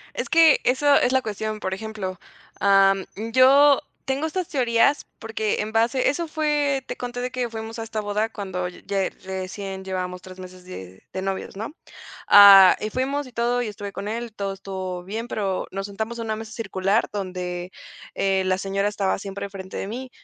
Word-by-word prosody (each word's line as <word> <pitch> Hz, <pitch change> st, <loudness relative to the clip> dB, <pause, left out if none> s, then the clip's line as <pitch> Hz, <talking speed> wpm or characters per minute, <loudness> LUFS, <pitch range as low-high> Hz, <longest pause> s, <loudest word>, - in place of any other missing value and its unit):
Es -, -, -3 dB
que, 330 Hz, -2 st, +6 dB
eso 280 Hz, +3 st, +3 dB
es 250 Hz, -, +3 dB
la 260 Hz, 0 st, +3 dB
cuestión, 215 Hz, -1 st, -4 dB
por 190 Hz, -2 st, -3 dB
ejemplo, 195 Hz, -3 st, -5 dB, 0.4 s
am, 195 Hz, -1 st, +4 dB, 0.3 s
yo 275 Hz, +2 st, +6 dB, 0.2 s
tengo 270 Hz, +4 st, -1 dB
estas 360 Hz, +2 st, -3 dB
teorías 255 Hz, -1 st, +2 dB
porque, 220 Hz, -2 st, -2 dB
en 210 Hz, +1 st, -4 dB
base 230 Hz, +4 st, +2 dB
Eso 330 Hz, +5 st, -2 dB
fue 295 Hz, -3 st, 0 dB
te -, -, -4 dB
conté 245 Hz, 0 st, -5 dB
de 250 Hz, 0 st, -3 dB
que 250 Hz, -1 st, -2 dB
fuimos 225 Hz, 0 st, -7 dB
a -, -, -3 dB
esta 225 Hz, -1 st, -4 dB
boda 210 Hz, +2 st, -1 dB
cuando 190 Hz, -4 st, -4 dB
ya 195 Hz, +1 st, -3 dB
recién 190 Hz, +1 st, -5 dB
llevábamos 180 Hz, -1 st, -4 dB
tres 185 Hz, 0 st, -12 dB
meses 185 Hz, 0 st, -11 dB
de 95 Hz, -, -10 dB
de 190 Hz, -, -4 dB
novios, 195 Hz, 0 st, -4 dB
¿no?, 220 Hz, +7 st, -5 dB, 0.6 s
ah, 200 Hz, -2 st, +10 dB
y 215 Hz, -, -3 dB
fuimos, 275 Hz, +4 st, -1 dB
y 255 Hz, -, -13 dB
todo, 240 Hz, +1 st, 0 dB
y 235 Hz, -, -3 dB
estuve 205 Hz, -1 st, -7 dB
con 200 Hz, -, -5 dB
él, 230 Hz, 0 st, -4 dB
todo 200 Hz, -2 st, -3 dB
estuvo 190 Hz, -2 st, -6 dB
bien, 220 Hz, +5 st, -5 dB
pero 195 Hz, -5 st, -2 dB
nos 195 Hz, +1 st, -4 dB
sentamos 220 Hz, +3 st, -5 dB
en 230 Hz, -, -4 dB
una 220 Hz, -1 st, -2 dB
mesa 220 Hz, 0 st, -8 dB
circular 200 Hz, -1 st, 0 dB
donde, 180 Hz, -2 st, -4 dB, 0.4 s
eh, 195 Hz, -1 st, +1 dB
la 185 Hz, 0 st, +1 dB
señora 195 Hz, +1 st, -1 dB
estaba 200 Hz, -2 st, -1 dB
siempre 200 Hz, 0 st, -6 dB
enfrente 195 Hz, -1 st, -9 dB
de -, -, -3 dB
mí, 250 Hz, +5 st, -6 dB
210 Hz, 190 wpm, -23 LUFS, 190-245 Hz, 0.6 s, ah